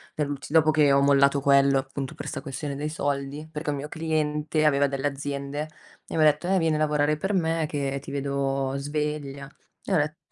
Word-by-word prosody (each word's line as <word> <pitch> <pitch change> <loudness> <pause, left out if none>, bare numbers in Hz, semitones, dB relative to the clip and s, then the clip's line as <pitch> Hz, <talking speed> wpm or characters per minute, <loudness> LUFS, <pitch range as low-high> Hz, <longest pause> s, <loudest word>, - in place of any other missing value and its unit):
per 150 -2 -1
l'ulti 140 0 -6
dopo 155 -1 +5
che 150 -2 +4
ho 140 - +5
mollato 140 0 +4
quello, 140 0 +4
appunto 135 0 -4
per - - -7
sta 135 - -4
questione 140 0 -5
dei 150 +2 -3
soldi, 145 0 -3
perché 155 -1 -5
un 145 - -1
mio 145 +2 -5
cliente 155 -1 -1
aveva 140 -1 +4
delle 135 +1 -1
aziende, 140 +1 -4 0.4
e - - -6
mi - - +3
ha - - +6
detto: 150 +3 +3
"Eh 190 +1 +3
vieni 165 -3 +2
a - - -1
lavorare 150 0 +2
per 195 +7 -2
me 165 -3 +1
che 140 -2 -2
ti - - -9
vedo 135 -1 -1
sveglia", 145 -1 -3 0.4
e - - -2
ho - - +4
det 150 +1 -1
145 Hz, 215 wpm, -26 LUFS, 140-155 Hz, 0.4 s, ha